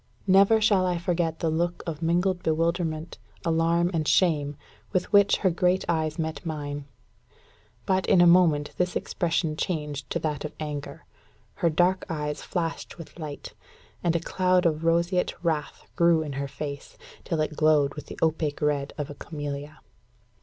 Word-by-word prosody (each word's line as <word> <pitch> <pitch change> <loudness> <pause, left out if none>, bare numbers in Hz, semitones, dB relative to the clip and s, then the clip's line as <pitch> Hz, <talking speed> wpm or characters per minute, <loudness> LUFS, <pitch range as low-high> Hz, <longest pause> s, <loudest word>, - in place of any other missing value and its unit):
Never 195 +3 +5
shall 205 -3 +3
I 180 -1 0
forget 170 -2 -1
the 165 - +1
look 170 +2 -1
of 160 -2 -5
mingled 175 +2 +1
bewilderment, 165 0 -1 0.3
alarm, 165 +1 +2
and 155 -2 -1
shame, 150 -5 +2 0.4
with 185 +3 -1
which 200 0 +6
her 185 - +5
great 180 +2 +1
eyes 160 -2 0
met 160 -1 -3
mine. 145 -3 -4 1.0
But, 190 0 +1
in 190 - +5
a 175 - +7
moment, 170 -4 +4
this 180 0 0
expression 165 -2 -1
changed 150 -4 -3
to - - -1
that 150 -2 -3
of 150 - -6
anger. 150 -2 -6 0.5
Her 170 - +1
dark 180 +4 +2
eyes 150 -2 -3
flashed 165 -2 -4
with 165 0 -11
light; 150 -3 -7 0.5
and 170 -1 +1
a - - +3
cloud 185 +1 +1
of 160 -1 +1
roseate 170 +2 +1
wrath 160 -3 -2
grew 170 -2 +4
in 145 -2 -5
her 140 +1 -3
face, 140 0 -7 0.3
till 165 - -2
it 155 0 -1
glowed 150 -3 +3
with 150 - -9
the - - -9
opaque 155 -2 0
red 145 -1 0
of 145 -1 -4
a - - -6
camellia. 145 -1 -6
165 Hz, 165 wpm, -26 LUFS, 150-175 Hz, 1.0 s, a